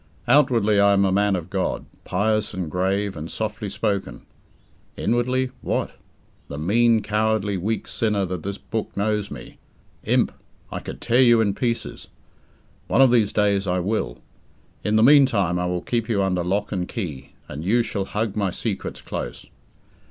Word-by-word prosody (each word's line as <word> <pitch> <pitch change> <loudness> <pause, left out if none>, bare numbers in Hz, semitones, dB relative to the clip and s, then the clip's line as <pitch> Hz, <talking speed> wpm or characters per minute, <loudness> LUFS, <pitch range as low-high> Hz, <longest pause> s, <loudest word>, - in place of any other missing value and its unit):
Outwardly 115 -8 +4
I 100 0 +5
am 100 0 +3
a 95 - +2
man 100 +1 +2
of 90 0 -5
God, 95 -2 -1 0.2
pious 105 +2 0
and 90 -5 -4
grave 95 +3 0
and 80 +1 -6
softly 105 -1 -3
spoken. 100 - -3 0.7
Inwardly 125 +2 0
what? - - -1 0.6
The 70 - -7
mean, 110 +7 +3
cowardly, 105 -1 0
weak 105 +5 -2
sinner 105 -3 0
that 90 -2 -4
this 100 +3 -4
book 110 -2 -5
knows 105 0 0
me...Imp! - - -3 0.4
I - - -3
could - - -8
tear 120 +3 +3
you 120 -2 +6
in 105 -3 +2
pieces!...One 120 +3 -4
of 130 -2 +6
these 110 -4 +3
days 100 -2 +1
I 90 0 +1
will. 90 - -1 0.7
In 105 - +1
the 110 - +5
meantime, 115 - +5
I 90 - -1
will 90 0 -2
keep 115 -1 -2
you 100 -4 +2
under 90 -2 0
lock 100 +4 -1
and 90 -2 -2
key, 75 - -6
and 75 +4 -6
you 115 +6 +2
shall 100 -4 -3
hug 105 0 -2
my 100 -3 0
secrets - - -4
close. - - -5
100 Hz, 160 wpm, -23 LUFS, 95-110 Hz, 0.7 s, you